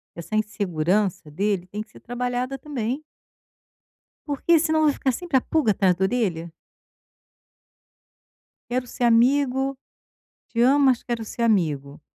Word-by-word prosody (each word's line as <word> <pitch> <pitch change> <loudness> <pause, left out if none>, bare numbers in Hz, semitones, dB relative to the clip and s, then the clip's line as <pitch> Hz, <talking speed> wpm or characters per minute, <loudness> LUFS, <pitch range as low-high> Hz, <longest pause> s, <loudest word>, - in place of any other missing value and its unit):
Essa 170 +5 -6
insegurança 195 -4 0
dele, 195 +2 -1
tem 205 +3 -5
que 215 - -10
ser - - -16
trabalhada 250 +2 -3
também 265 0 -4 1.2
porque, 315 +3 +2
senão, 315 0 +2
vai 295 - +4
ficar 265 - 0
sempre 340 +1 0
a - - +2
pulga 300 -7 +1
atrás 190 -3 +2
da 190 - -1
orelha 190 -7 -1 2.2
"quero 250 +1 -1
ser 245 - -5
amigo. 265 +3 +3 0.7
Te 230 - -1
amo, 275 +3 +5
mas 255 -2 +3
quero 235 -2 -3
ser 235 - -5
amigo". 155 -11 0
235 Hz, 135 wpm, -24 LUFS, 195-270 Hz, 2.2 s, amo